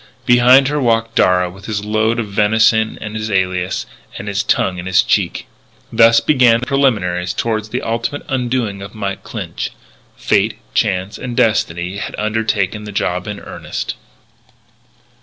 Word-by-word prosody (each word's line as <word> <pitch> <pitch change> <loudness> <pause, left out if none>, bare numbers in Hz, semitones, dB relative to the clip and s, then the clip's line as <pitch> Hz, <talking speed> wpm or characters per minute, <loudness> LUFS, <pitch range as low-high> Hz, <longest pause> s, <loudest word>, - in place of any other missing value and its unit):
Behind 125 +2 +6
her 150 +1 0
walked 115 -2 +1
Darragh 90 -3 +2
with 95 +1 -13
his 105 -2 -3
load 110 +2 +1
of 110 -3 -3
venison 110 +2 +3
and 105 0 -7
his 110 0 -3
alias, 95 -2 -1 0.3
and 105 - -7
his 100 0 0
tongue 95 -3 0
in 90 - -6
his 95 -1 +4
cheek. - - 0 0.5
Thus 115 0 +6
began 125 -5 +4
the - - -3
preliminaries 100 -10 0
toward 110 -2 -1
the 120 +3 -4
ultimate 115 +5 -2
undoing 120 -6 -1
of 100 +2 -9
Mike 100 -2 -4
Clinch. - - -5 0.5
Fate, - - +1 0.2
Chance, 95 +1 0
and 125 -2 -6
Destiny 90 -4 +1
had - - -5
undertaken 105 -1 -1
the 105 - -7
job 90 -1 -2
in 105 -1 -5
earnest. - - -5
110 Hz, 155 wpm, -17 LUFS, 95-115 Hz, 0.5 s, Behind